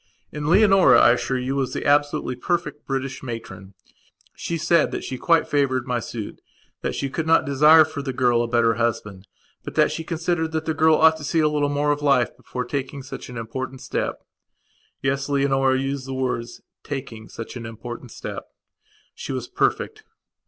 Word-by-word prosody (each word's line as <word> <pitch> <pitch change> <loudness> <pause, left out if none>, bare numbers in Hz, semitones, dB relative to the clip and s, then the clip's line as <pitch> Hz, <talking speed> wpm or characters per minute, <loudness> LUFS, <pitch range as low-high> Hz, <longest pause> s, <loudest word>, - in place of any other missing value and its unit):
And 150 0 -4
Leonora, 195 0 +6
I - - +7
assure 130 +2 0
you, 130 +2 -2
was 135 -2 -1
the - - -4
absolutely 145 -3 +2
perfect 160 +2 -3
British 135 0 -3
matron. 100 -6 -8 0.6
She 170 - -3
said 170 +2 +3
that - - -5
she 130 - -5
quite 165 -1 +3
favoured 130 -3 +1
my 125 -2 -1
suit; 110 -2 -7 0.4
that - - -2
she 140 - -2
could 160 +4 -3
not 165 - +4
desire 150 +3 +6
for 150 -2 -6
the 135 -1 -3
girl 125 -2 +2
a 120 - -1
better 115 -1 +3
husband; 105 -4 -2 0.4
but - - -8
that - - +4
she 165 - -4
considered 160 0 -2
that 160 0 -2
the 160 - 0
girl 160 0 +4
ought 160 +1 +5
to 155 - -10
see 160 +3 0
a 155 - +4
little 150 -1 0
more 145 +1 +1
of 145 0 -1
life 140 -4 +2
before 125 0 -6
taking 140 0 -4
such 130 - -8
an 125 - -8
important 130 +3 -5
step. - - -4 0.8
Yes, 135 +1 -1
Leonora 135 -2 +2
used 135 0 -3
the 135 - -4
words 125 -2 -3 0.2
"taking 120 -6 -7
such 115 - -8
an 115 -2 -6
important 120 +2 -8
step". - - -7 0.7
She - - -7
was - - -4
perfect. 435 0 -1
135 Hz, 190 wpm, -23 LUFS, 125-150 Hz, 0.8 s, I